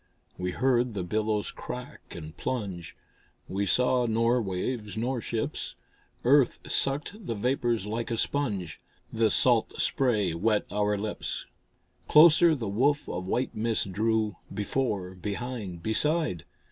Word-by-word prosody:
We 90 0 -3
heard 125 +3 +1
the 95 - -2
billows 105 +2 -1
crack 125 -1 -8
and 80 -2 -8
plunge, 95 -10 -4 0.5
We 100 +1 -1
saw 125 +2 +2
nor 115 +2 +2
waves 105 +3 -3
nor 120 +2 -1
ships. 115 0 -3 0.5
Earth 135 +1 +4
sucked 150 +10 +1
the 115 - -1
vapors 120 -1 0
like 115 +2 -3
a 115 - -1
sponge, 105 - -2 0.3
The 115 -1 +3
salt 120 +1 +2
spray 110 - +1
wet 105 +5 +1
our 105 0 +1
lips. 105 +1 -4 0.6
Closer 160 +1 +7
the 120 -6 -4
woof 135 +9 +1
of 90 +1 -4
white 125 +6 -1
mist 110 -3 -1
drew, 110 -1 0
Before, 105 -4 -2
behind, 100 -2 -5
beside. 150 - +1
110 Hz, 130 wpm, -28 LUFS, 100-125 Hz, 0.6 s, Closer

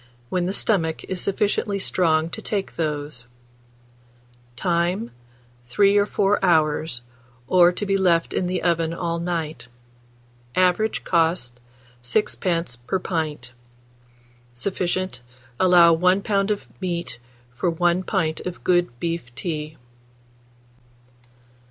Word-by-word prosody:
when 180 -1 0
the - - 0
stomach 170 -6 0
is 185 -1 -4
sufficiently 200 0 0
strong 165 -4 +1
to - - -6
take 200 -2 -3
those. 145 -5 -3 1.3
Time. 175 - 0 0.6
3 200 +10 +3
or 205 0 +4
4 205 0 +1
hours, 155 -7 +2 0.4
or 175 -1 +6
to 195 +3 -3
be 195 0 +1
left 175 -4 +2
in 180 - 0
the 180 0 -2
oven 165 -1 +1
all 170 -1 -2
night. 165 -5 -3 0.9
Average 185 +4 +2
cost, 160 -8 +1 0.4
6d. 165 - -1
per 190 - +1
pint. 155 -9 -3 1.0
Sufficient. 185 0 -2 0.4
Allow 175 -2 +6
1 180 +4 +3
lb. 200 -2 +1
of 210 -1 -2
meat 170 -9 -3 0.3
for 150 +8 -1
1 175 +2 +1
pint 180 -5 -1
of 180 -1 -7
good 175 -9 +1
beef 165 -8 -4
tea. 155 -2 -4
175 Hz, 115 wpm, -23 LUFS, 160-185 Hz, 1.3 s, or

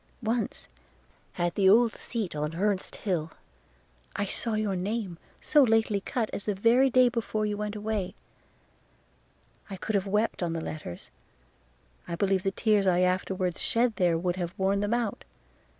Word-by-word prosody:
Once, 225 +1 -2 0.7
at 175 -1 0
the 195 -2 +4
old 230 +3 +6
seat 220 -9 -4
on 150 0 -1
the 165 - -8
Hurst 200 0 0
hill, 165 -6 -2 0.8
I 205 - 0
saw 220 +3 -1
your 215 -2 0
name, 190 -1 -3 0.2
so 300 - +4
lately 220 -4 +3
cut 225 +2 -2
as 200 - -4
the 210 - 0
very 235 +7 +4
day 255 0 +5
before 220 -2 -1
you 210 0 -1
went 210 0 -4
away; 210 -3 -3 1.5
and 195 -2 -7
could 220 - -2
I - - +5
have 195 - -8
wept 210 +2 0
on 170 -2 -1
the 165 - -2
letters, 155 - -7 1.0
I 170 - -3
believe 195 +1 +1
the 195 - 0
tears 205 0 +2
I 180 -1 +3
afterwards 185 -1 0
shed 235 -1 +1
there 175 -3 +3
would 175 +1 -1
have 175 -1 -4
worn 195 +1 +1
them 205 +3 +1
out. 235 -4 -2
200 Hz, 170 wpm, -28 LUFS, 180-220 Hz, 1.5 s, old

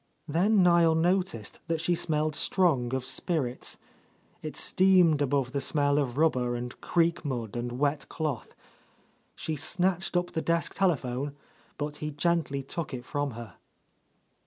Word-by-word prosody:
Then 185 +6 +3
Niel 170 -2 +5
noticed 175 - 0
that 165 -1 -1
she 160 +2 +1
smelled 155 -2 0
strong 145 -8 +1
of 130 -1 -3
spirits; 130 -1 -2 0.6
it 155 - -6
steamed 180 -5 +4
above 135 -2 0
the 140 0 -2
smell 145 -1 +3
of 130 -3 -2
rub 160 +1 +4
ber 125 -1 -1
and 120 +1 -6
creek 170 -1 +1
mud 120 -7 -4
and 120 0 -3
wet 140 +2 -1
cloth. 150 -7 -4 0.8
She 160 - -3
snatched 180 +4 0
up 175 0 -1
the 160 - -2
desk 170 0 0
telephone, 140 -6 -1 0.4
but 150 0 -4
he 150 - -4
gently 150 -2 0
took 150 0 -4
it 120 -1 -8
from 145 -1 -2
her. 115 -3 -10
150 Hz, 150 wpm, -28 LUFS, 130-170 Hz, 0.8 s, Niel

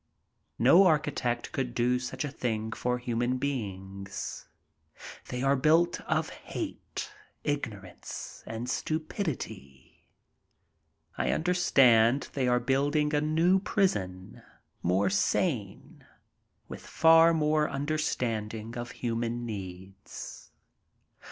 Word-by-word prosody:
No 170 +11 +7
architect 140 -6 0
could 125 -3 -3
do 125 +1 +2
such 130 +2 -4
a 145 - -5
thing 110 -4 -2
for 125 +2 -1
human 120 0 -1
beings. 100 -7 -5 0.8
They 125 +1 -4
are 135 +1 +4
built 160 +6 +3
of - - +1
hate, - - -6 0.3
ignorance, 105 -11 -5
and 115 +2 -5
stupidity. 150 - -4 1.1
I - - +1
understand 135 -8 +4
they 130 -3 0
are 125 0 +3
building 145 +4 +1
a 145 - +2
new 165 +5 +3
prison, 95 - -1 0.4
more 95 +2 +2
sane, 105 - -1 0.6
with - - -8
far 165 +1 +6
more 155 -1 +2
understanding 115 -7 -2
of 120 0 -5 0.2
human 120 +1 -1
needs. 95 -2 -8
125 Hz, 100 wpm, -29 LUFS, 110-150 Hz, 1.1 s, No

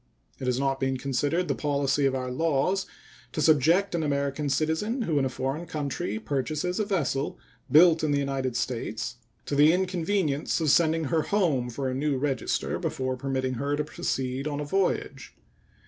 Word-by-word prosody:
It 130 - -4
has 125 0 +1
not 135 0 0
been 135 0 0
considered 140 +7 0
the - - +1
policy 140 -1 +1
of 135 - 0
our 130 -1 -3
laws 165 +7 +1 0.5
to - - -3
subject 160 +6 +4
an 170 - 0
American 140 -1 -1
citizen 160 - 0
who 155 -8 +1
in 135 - +1
a - - 0
foreign 135 +6 -3
country 140 -9 -3
purchases 150 - -2
a 215 - +1
vessel 155 -9 -1 0.3
built 160 +1 +6
in 155 - +1
the 145 - +2
United 135 -3 -1
States 115 -1 -3 0.3
to - - -4
the 150 +2 +6
inconvenience 180 -4 0
of 155 -3 +2
sending 165 0 +3
her 155 +2 +1
home 155 -9 +1
for 135 +3 -3
a 130 - -1
new 140 +1 0
register 135 -2 -1
before 130 0 -2
permitting 130 0 -2
her 145 +1 0
to 150 - -1
proceed 135 -1 -3
on 145 -1 -3
a 150 - -3
voyage. 190 +5 -1
145 Hz, 180 wpm, -27 LUFS, 135-160 Hz, 0.5 s, built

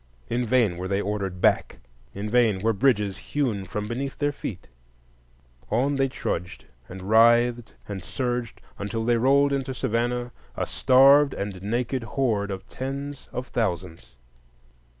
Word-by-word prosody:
In 120 0 -1
vain 110 -7 +2
were 90 +1 -4
they 100 +1 0
ordered 100 -3 -3
back, - - +2 0.4
in 100 +2 -4
vain 110 -4 +2
were 115 0 +3
bridges 105 -4 +1
hewn 115 -9 -2
from 105 +2 -4
beneath 130 +4 -4
their 145 0 +1
feet; 105 -9 -7 1.0
on 130 +6 +1
they 135 0 +2
trudged 90 -8 -4 0.2
and 95 +1 -8
writhed 120 +2 +4
and 95 -3 -6
surged, 125 -3 -3 0.2
until 110 +3 -3
they 120 0 +3
rolled 140 +3 +3
into 135 -1 -2
Savannah, 120 +1 -1 0.3
a - - 0
starved 140 +2 +5
and 100 -2 -5
naked 120 +5 -1
horde 115 -4 -1
of 95 -1 -6
tens 140 +1 -6
of 125 0 -5
thousands. 90 - -3
115 Hz, 145 wpm, -25 LUFS, 100-130 Hz, 1.0 s, starved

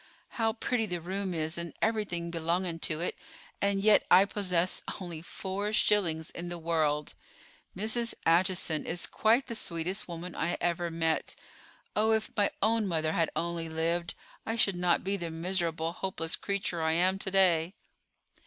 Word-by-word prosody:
How 225 -2 0
pretty 235 -1 -1
the 175 -2 -2
room 190 +3 -3
is 160 0 -2
and 170 -1 -6
everything 200 -6 -1
belonging 170 +1 -1
to 160 -1 -1
it; 175 - -1 0.5
and 200 0 +2
yet 210 +1 +6
I 190 +2 +8
possess 185 -3 0 0.2
only 175 -4 -6
four 195 +4 -4
shillings 170 -7 +2
in 175 0 -6
the 175 - -4
world. 155 -3 0 0.6
Mrs. 225 +3 0
Acheson 170 -2 +2
is 170 +1 -1
quite 230 +5 +2
the 235 - -5
sweetest 180 -2 -2
woman 170 0 -6
I 170 +2 -1
ever 175 0 0
met. 165 -1 0 0.6
Oh, 220 +1 +3
if 220 0 0
my 205 -2 +3
own 220 0 +2
mother 160 -3 0
had 165 -1 +1
only 170 -1 -2
lived. 170 +2 -1 0.3
I 225 - -2
should 205 -5 +3
not 175 -1 +2
be 195 +1 0
the 170 -3 -4
miserable, 165 -1 -1
hopeless 170 -2 -1
creature 195 -4 -2
I 160 0 +2
am 185 +3 +2
to 195 - -1
day!" 185 -2 +3
175 Hz, 160 wpm, -30 LUFS, 165-200 Hz, 0.6 s, I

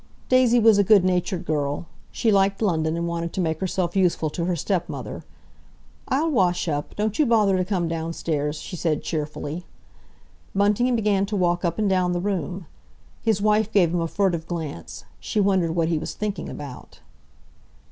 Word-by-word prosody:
Daisy 255 -2 +5
was 220 -2 +5
a - - +5
good 200 -1 +5
natured 180 -1 0
girl; 145 0 -1 0.3
she 225 - +1
liked 195 0 +3
London, 165 -6 0
and 170 0 -2
wanted 170 0 -3
to - - -3
make 160 -3 0
herself 185 -1 -1
useful 175 -5 +2
to 170 +1 -2
her 180 0 0
stepmother. 175 +2 -3 0.8
"I'll 315 +5 +1
wash 180 -9 +2
up; 145 -2 -3
don't 215 +3 -1
you 305 - +5
bother 215 -4 +4
to 185 - +1
come 180 -3 -1
downstairs," 160 -2 -2
she 180 - -7
said 160 -3 -1
cheerfully. 150 +1 -4 0.9
Bunting 210 +5 +2
began 205 -3 +1
to 210 - -3
walk 175 -2 +1
up 170 -2 0
and 215 -1 +1
down 185 -2 +2
the 175 - -1
room. 185 -1 -3 0.6
His 215 -3 +1
wife 215 0 +2
gave 175 -6 +3
him 175 - +1
a 165 - 0
furtive 170 -3 0
glance; 160 - -6 0.2
she 210 - -2
wondered 190 -5 +2
what 165 -1 +1
he 165 -2 +1
was - - -6
thinking 210 -1 -3
about. 140 -4 -9
180 Hz, 180 wpm, -24 LUFS, 165-205 Hz, 0.9 s, Daisy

